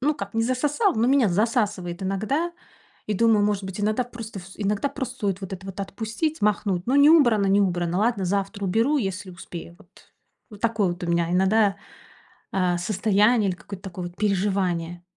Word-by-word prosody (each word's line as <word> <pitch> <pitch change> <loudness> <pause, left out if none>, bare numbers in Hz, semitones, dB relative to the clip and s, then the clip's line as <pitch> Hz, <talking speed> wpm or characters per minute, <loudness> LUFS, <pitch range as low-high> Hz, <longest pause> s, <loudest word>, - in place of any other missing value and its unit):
Ну 295 +3 +1
как, 200 -2 -7
не 225 - +2
засосала, 295 - +1
но 230 +3 +2
меня 265 -6 +4
засасывает 205 -3 0
иногда. 265 - -1 0.6
И 210 - 0
думаю, 220 -1 +4
может 205 -2 0
быть, 190 +2 -6
иногда 215 +4 +1
просто 230 -3 -8
всё 195 +3 -9
иногда 210 +7 0
просто 265 -2 -5
стоит 200 -4 -2
вот 190 - -6
это 190 +1 -11
вот 195 +1 -6
отпустить, 220 - -3
махнуть. 200 -3 +1
Ну 255 - +1
не 285 +2 +7
убрано, 240 -11 +5
не 200 +1 +4
убрано, 175 -2 0
ладно, 215 -3 +1
завтра 200 +2 -2
уберу, 225 +10 +2
если 190 -3 -3
успею. 170 -1 -9
Вот. - - -20 0.6
Вот 210 -1 -12
такое 220 -4 +1
вот 175 +1 -4
у - - -4
меня 170 0 +1
иногда, 195 +2 +3 0.8
э, 180 -2 +1
состояние 210 +3 +2
или 180 - -4
какое-то 195 +2 -10
такое, 180 -1 -6
вот, 175 - -19
переживание. 185 -4 -1
200 Hz, 185 wpm, -24 LUFS, 185-230 Hz, 0.8 s, не